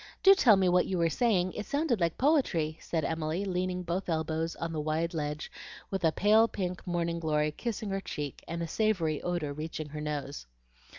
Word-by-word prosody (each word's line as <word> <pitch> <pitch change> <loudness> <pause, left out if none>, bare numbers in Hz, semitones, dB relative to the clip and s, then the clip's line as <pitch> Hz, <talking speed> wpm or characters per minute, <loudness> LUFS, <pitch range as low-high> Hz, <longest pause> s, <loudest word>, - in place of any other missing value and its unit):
Do 390 -1 +9
tell 245 - +6
me 190 -1 +2
what 180 0 +3
you 185 - -1
were 165 -1 +2
saying. 185 -6 +1
It 210 - -5
sounded 285 -6 0
like 170 -1 +1
poetry," 185 - +1
said 160 -2 -2
Emily, 160 +4 -2
leaning 180 -1 -1
both 175 +2 -3
elbows 160 0 -1
on 165 0 -4
the 155 - -2
wide 160 +3 -1
ledge 150 -1 -3 0.4
with 190 -2 -2
a 160 - +4
pale 215 +6 +4
pink 185 -4 -4
morning 170 -1 -1
glory 150 -2 +1
kissing 215 +3 -4
her 195 0 -1
cheek, 145 -7 -6
and 170 0 -3
a - - -3
savory 170 -7 0
odor 175 -5 -2
reaching 155 0 -5
her 150 +1 -6
nose. 145 - -4
170 Hz, 195 wpm, -30 LUFS, 155-195 Hz, 0.4 s, Do